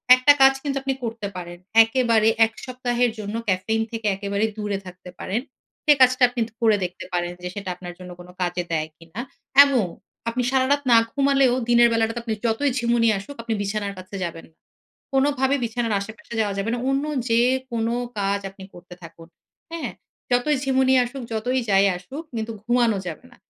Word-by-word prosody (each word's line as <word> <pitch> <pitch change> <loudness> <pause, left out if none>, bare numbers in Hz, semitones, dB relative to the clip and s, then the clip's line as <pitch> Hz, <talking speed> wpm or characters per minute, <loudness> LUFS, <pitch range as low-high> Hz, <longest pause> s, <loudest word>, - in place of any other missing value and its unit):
একটা 255 +3 +6
কাজ 270 0 +8
কিন্তু 280 -2 -2
আপনি 270 0 0
করতে 225 -3 -4
পারেন। 175 -1 -7 0.3
একেবারে 225 -2 +2 0.2
১ 225 - -7
সপ্তাহের 245 -2 0
জন্য 210 +1 -5
caffeine 220 +4 0
থেকে 225 -2 -3
একেবারে 200 +2 -1
দূরে 205 -2 -2
থাকতে 180 0 -11
পারেন। 210 +6 -2 0.4
সে 300 - +7
কাজটা 255 0 +5
আপনি 245 -1 -3 0.2
ধরে 225 -3 +3
দেখতে 180 +1 -7
পারেন 175 0 -1
যে 180 - -3
সেটা 200 -2 -5
আপনার 175 -1 -9
জন্য 180 -1 -9
কোন 175 - -11
কাজে 175 0 -1
দেয় 155 -1 0
কি 165 - -17
না? 225 - -4 0.4
এবং 255 -8 +1 0.4
আপনি 250 +2 -1
সারারাত 270 +2 +2
না - - +8 0.2
ঘুমালেও 275 -2 +3 0.2
দিনের 240 0 +6
বেলাটাতে 225 +1 0
আপনি 225 - -2
যতই 235 +5 +1
ঝিমুনি 235 -1 +1
নিয়ে 225 -2 +4
আসুক 280 +9 -10
আপনি 230 -1 -2
বিছানার 200 0 -2
কাছে 185 +2 -10
যাবেন 165 -1 -6
না। - - -40 0.6
কোনভাবে 270 0 +2
বিছানার 230 -1 -1
আশেপাশে 220 +3 -9
যাওয়া 205 -2 0
যাবে 200 +3 -1
না। - - -3
অন্য 270 +1 +1 0.2
যে 230 0 +3 0.3
কোন 230 -1 -1 0.3
কাজ 200 0 0
আপনি 195 0 -12
করতে 175 0 -12
থাকুন। 165 0 -12 0.4
হ্যাঁ? 305 -9 -4 0.4
যতই 245 +5 +2
ঝিমুনি 265 -1 +3
আসুক, 260 +1 -7
যতই 250 +4 0
যাই 195 0 +5
আসুক 260 - -8
কিন্তু 225 +1 -3
ঘুমানো 240 -2 +2
যাবে 170 +7 -6
না। - - -17
225 Hz, 185 wpm, -23 LUFS, 195-255 Hz, 0.6 s, কাজ